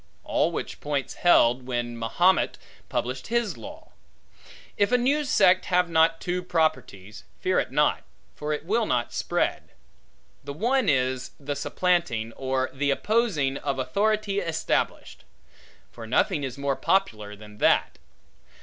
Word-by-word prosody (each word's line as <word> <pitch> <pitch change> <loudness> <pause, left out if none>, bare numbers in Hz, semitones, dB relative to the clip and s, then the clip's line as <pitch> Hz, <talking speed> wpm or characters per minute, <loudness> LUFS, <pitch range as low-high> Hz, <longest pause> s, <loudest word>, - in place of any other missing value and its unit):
All - - +1
which - - -5
points 145 -2 -2
held, 125 -7 +3
when 120 -1 -3
Mahomet 155 +11 +2 0.3
published 130 +1 -3
his 235 -1 0
law. - - -11 0.8
If 205 +3 +1
a 250 - +5
new 280 +5 +1
sect 190 -9 +4
have 180 -1 +1
not 165 0 +3
two 180 0 -2
properties, 130 - -2 0.2
fear - - +1
it - - -3
not; - - +2 0.3
for 150 +1 -5
it 150 +1 -3
will 220 +4 +1
not 120 -1 -1
spread. - - -2 0.7
The 140 - -6
one 240 - +1
is 130 -2 0
the 145 0 -4
supplanting, 140 -8 0
or 130 0 -2
the 145 +2 -1
opposing, 155 - +1
of 140 -2 -3
authority 200 +9 0
established; 165 -4 -2 0.7
for 115 -1 -10
nothing 145 - +1
is 130 -1 -5
more 140 -1 -1
popular 110 - 0
than 105 0 -14
that. - - +2
145 Hz, 140 wpm, -25 LUFS, 130-190 Hz, 0.8 s, a